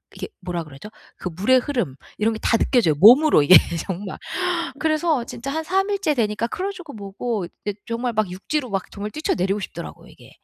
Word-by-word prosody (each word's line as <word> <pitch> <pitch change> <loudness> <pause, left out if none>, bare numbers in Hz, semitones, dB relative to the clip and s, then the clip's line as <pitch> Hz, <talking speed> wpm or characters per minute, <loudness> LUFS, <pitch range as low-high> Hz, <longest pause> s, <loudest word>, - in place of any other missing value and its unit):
이게 - - -6
뭐라 180 -3 -4
그러죠? 150 +6 -11 0.3
그 180 - -4
물의 205 +10 +3
흐름 240 - -2 0.2
이런 220 +2 +1
게 220 - -6
다 230 - +2
느껴져요. 225 - +3
몸으로 250 - +7
이게 180 +5 +8 0.3
정말. 190 +1 -5 0.6
그래서 310 -4 +1
진짜 245 +3 -6
한 320 +3 -2
3 385 +4 0
일째 395 -7 0
되니까 220 -2 0
크루즈고 365 +2 -5
뭐고 205 0 -4 0.2
이제 205 0 -4
정말 235 +1 -2
막 215 -4 0
육지로 255 +9 -3
막 195 -1 -3
정말 205 +1 -6
뛰쳐 310 +7 -1
내리고 195 +3 0
싶더라고요. - - -8
이게. - - -17
225 Hz, 385 characters per minute, -22 LUFS, 195-295 Hz, 0.6 s, 이게